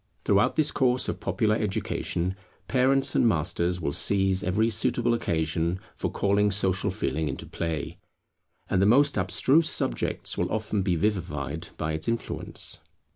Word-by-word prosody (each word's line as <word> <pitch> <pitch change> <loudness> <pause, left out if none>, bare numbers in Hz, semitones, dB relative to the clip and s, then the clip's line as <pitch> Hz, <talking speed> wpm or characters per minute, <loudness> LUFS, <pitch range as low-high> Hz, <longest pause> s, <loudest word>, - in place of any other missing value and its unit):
Throughout 100 0 +3
this 155 -2 +2
course 130 -2 +2
of - - -3
popular 110 -3 0
education, 95 -3 -2 0.3
parents 135 +1 +3
and 120 - +3
masters 90 -1 0
will 80 -4 -2
seize 95 +3 +2
every 105 +5 +1
suitable 120 +2 +1
occasion 85 -3 -1 0.2
for - - -2
calling 100 +1 +1
Social 95 -2 0
Feeling 80 0 -2
into - - -6
play; 80 +1 -4 0.7
and 95 - +1
the 100 - +4
most 140 +6 +4
abstruse 130 - +2
subjects - - -1
will - - -1
often 110 -1 -1
be 95 -2 0
vivified 85 -7 -2
by 80 0 -2
its 80 0 -3
influence. 115 0 -1
95 Hz, 145 wpm, -26 LUFS, 85-115 Hz, 0.7 s, the